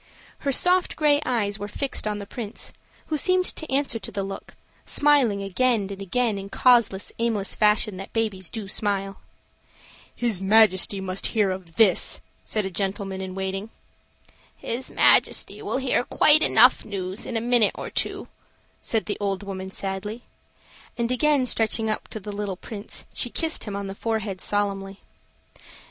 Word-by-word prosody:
Her 280 - -1
soft 360 +6 +2
gray 295 -2 +3
eyes 215 -4 -1
were 205 - -4
fixed 265 +1 -2
on 210 -1 -2
the 200 - -7
Prince, 220 0 -6 0.3
who 310 - -2
seemed 370 +1 +3
to 315 - -5
answer 270 -4 0
to 195 - -8
the 200 - -3
look, 195 0 -8 0.3
smiling 265 -9 +3
again 230 +4 +1
and 195 0 -7
again 220 +1 0
in 195 - -7
the - - -10
causeless, 235 -4 +3
aimless 225 -4 0
fashion 210 -1 +2
that 195 - -8
babies 205 -6 -2
do 220 -3 -6
smile. 195 -1 -2 1.0
"His 230 -6 -1
Majesty 200 -1 +4
must 185 0 -2
hear 200 -3 +3
of 180 -3 -8
this," 205 -3 +4 0.2
said 215 -2 -1
a 190 - -4
gentleman 195 +1 -3
in 185 -1 -6
waiting. 195 +2 -4 0.9
"His 245 +3 -2
Majesty - - +3
will - - -2
hear 260 -2 +1
quite 305 +4 +5
enough 250 -1 +5
news 190 -1 -4
in 235 - -2
a - - +1
minute 235 -2 +3
or - - -6
two," - - -2 0.5
said 225 -2 -1
the 210 - -4
old 200 -1 -2
woman 190 -1 -6
sadly. 195 +4 -5 0.7
And 235 0 -1
again 285 +1 +2
stretching 225 -2 +1
up 215 - -4
to 220 - -6
the 205 +1 -7
little 200 -2 -4
Prince, 210 +2 -6
she 245 - +2
kissed 325 +6 0
him 205 -2 -5
on 200 0 -4
the 195 - -5
forehead 210 -3 -3
solemnly. 200 -1 -2
210 Hz, 165 wpm, -24 LUFS, 195-240 Hz, 1.0 s, quite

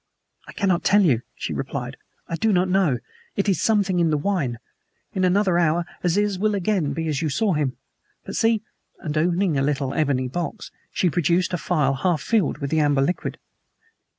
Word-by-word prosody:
"I - - -10
cannot 185 -4 +1
tell 205 +1 +5
you," 130 -10 +3
she - - -4
replied. - - -4 0.3
"I 165 - -3
do 220 +5 +1
not 185 -1 +3
know. 180 -8 +2 0.4
It 200 - 0
is 195 - +1
something 200 -5 +2
in 170 -1 +3
the 155 - +2
wine. 145 -8 -1 0.6
In 190 - -1
another 185 -1 +3
hour 170 0 +2 0.2
Aziz 195 +2 +1
will 215 +1 +1
be - - 0
again 175 -7 0
as 150 -3 -1
you 160 - 0
saw 210 +6 +1
him. 145 -4 -1 0.5
But - - -6
see." 225 -2 +2 0.3
And, 155 -3 -5
opening 170 -1 +1
a - - +1
little 135 -1 0
ebony 135 -4 +1
box, 175 - -5 0.2
she 180 - +1
produced 175 +2 +1
a - - +1
phial 150 -6 +1
half 160 +4 0
filled 215 -11 +1
with 140 -2 -4
the 160 - +2
amber 145 -2 +3
liquid. 180 +6 -2
175 Hz, 190 wpm, -23 LUFS, 150-195 Hz, 0.6 s, tell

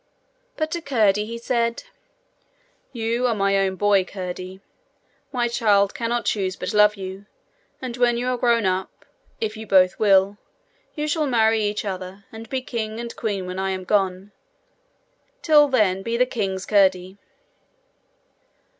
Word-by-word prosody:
But 310 0 -2
to 340 - -3
Curdie 215 -8 +2
he 230 +1 -5
said: 235 0 -1 1.1
'You 235 +1 -1
are 235 - 0
my 195 -1 +1
own 190 -1 0
boy, 200 0 +3
Curdie. 185 0 -7 0.7
My 245 -3 0
child 210 -4 +2
cannot 235 0 -2
choose 190 -3 -1
but - - -5
love 210 0 +5
you, 190 +1 -8 0.6
and 245 -2 -4
when 240 -1 +2
you 245 +1 -2
are 250 - 0
grown 235 -3 +2
up 185 0 -3 0.3
if 220 -1 -3
you 220 0 -9
both 185 -2 +4
will 200 -1 +3 0.6
you 300 -1 -2
shall 305 0 0
marry 225 -3 +3
each 210 0 -2
other, 190 0 -6
and 225 0 -10
be 260 -1 -2
king 220 -3 -4
and 235 0 -6
queen 200 -4 -3
when 185 +1 -5
I 190 0 -1
am 190 -1 -3
gone. 190 0 0 1.1
Till 300 -2 +6
then 210 -8 +2
be 230 +3 -2
the 250 - +4
king's 195 -6 -3
Curdie.' 190 -2 +2
210 Hz, 155 wpm, -23 LUFS, 190-235 Hz, 1.1 s, Till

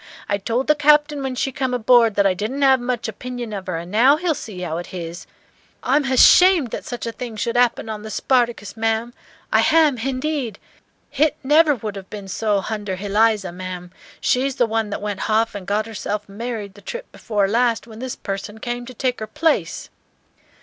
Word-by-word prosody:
I 200 0 0
told 235 +6 -1
the 300 - +5
Captain 295 0 +3
when 265 -1 -3
she 270 - -1
come 260 -1 -1
aboard 235 -2 +4
that 200 - +3
I 195 - +4
didn't 220 +9 -3
'ave 265 -2 +5
much 245 -1 -2
opinion 240 +1 -6
of 195 -2 -6
her, 180 -3 -2
and 170 +2 -7
now 250 +7 +5
he'll 340 0 0
see 210 -9 -8
how 170 -2 -3
it 175 - -7
h'is. 170 -1 -7 0.6
I'm 280 +3 +2
h'ashamed 285 - +6
that - - -5
such 245 -1 -5
a 230 - -2
thing 235 -1 -7
should 230 +3 -2
'appen 245 -2 +2
on 215 -1 -5
the 220 - -8
'Spartacus,' 235 -4 0
ma'am, 225 +1 -1 0.4
I - - +5
h'am, 315 -4 +4
h'indeed. 260 -2 -2 0.6
H'it 310 0 +4
never 300 +2 +5
would 210 -3 -5
'ave 190 - -13
ben 205 -2 -8
so 205 +1 0
h'under 210 -3 -3
h'Eliza, 205 0 +1
ma'am, 180 0 -7 0.3
she's 265 +1 +1
the 245 - +3
one 225 -1 -1
that 205 - -5
went 205 -2 -3
h'off 225 +1 +2
and 200 -2 -7
got 210 +2 0
herself 210 -1 -4
married 210 -1 -5
the 205 - -15
trip 485 - -7
before 205 -4 -1
last, 235 +2 +1
when 220 -1 -12
this 255 0 -4
person 200 +2 -5
came 240 +1 -5
to 255 - -10
take 250 +1 -1
her 215 - -5
place." 300 +6 -1
225 Hz, 200 wpm, -21 LUFS, 205-260 Hz, 0.6 s, h'ashamed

